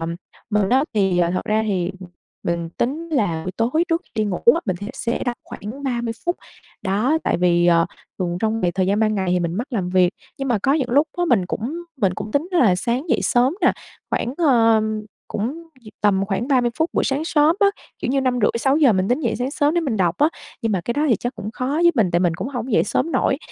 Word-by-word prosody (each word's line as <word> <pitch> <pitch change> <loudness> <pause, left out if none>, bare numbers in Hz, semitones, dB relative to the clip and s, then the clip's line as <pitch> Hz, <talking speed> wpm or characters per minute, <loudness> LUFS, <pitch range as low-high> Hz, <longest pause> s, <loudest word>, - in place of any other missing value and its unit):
à, 165 - -3 0.4
mình 210 -2 +2
á 265 +4 +3
thì, 190 -4 +2
thật 185 - -2
ra 215 +1 +1
thì, 185 -3 -1 0.5
mình 170 -1 -2
tính 315 +7 -1
là 200 - 0
buổi 185 - -4
tối 255 +9 +1
trước 330 0 +1
khi - - -32
đi 215 - +1
ngủ 190 -4 -2 0.2
á 335 - -1
mình 185 -3 0
thẽ 205 +3 -7
sẽ 240 -3 -2
đọc 245 -1 -2
khoảng 225 +8 -8
30 240 -4 -1
phút. 345 - +1 0.5
Đó 220 +11 +1
tại - - +1
vì, 175 -1 +3
ờ, 170 -1 +4 0.3
thường 175 -2 -1
trong 220 +1 0
việc 175 -2 0
thời 185 -1 +1
gian 200 +3 +1
ban 215 -1 +2
ngày 190 -3 -1
thì 180 - +2
mình 170 0 -2
mắc 235 +7 -3
làm 190 -6 -1
việc, 180 -1 +4 0.3
nhưng 270 0 -3
mà 235 -4 +2
có 270 - +3
những 270 -5 0
lúc 290 +5 +3
á 350 - +1
mình 190 -7 +3
cũng 270 - -4
mình 195 -7 +1
cũng 210 +2 -6
tính 295 +5 0
là 250 - +4
sáng 245 - -2
dậy - - +2
sớm 250 +4 +2
nè - - +5 0.4
khoảng, 245 - -1
ờ, 230 -8 +4 0.5
cũng 225 +7 -2 0.3
v - - -19
tầm 195 -2 +2
khoảng 215 +5 -2
30 250 -4 +3
phút 320 +2 +1
buổi - - +1
sáng 280 +4 -1
sớm 310 +2 +3
á, 405 - +6 0.3
kiểu - - -3
như 275 +1 +2
5:30-6:00 255 +2 +3
mình 190 0 0
tính 250 +5 +1
dậy - - -1
sáng 250 +2 -2
sớm 290 +2 +1
để 345 - +2
mình 265 -9 -1
đọc 175 -3 +1
á, 300 - +5 0.3
nhưng 225 - 0
mà 185 - 0
cái 235 - -3
đó 300 +1 +1
thì 230 - +4
chắc 245 +6 -4
cũng 210 - -6
khó 255 +3 -4
với 330 +5 +3
mình 215 -9 +2
tại 175 - +2
mình 175 -2 +2
cũng 230 - -4
hổng 250 -2 -4
dậy - - +4
sớm 320 +10 -1
nổi. - - +1
230 Hz, 250 wpm, -21 LUFS, 190-275 Hz, 0.5 s, á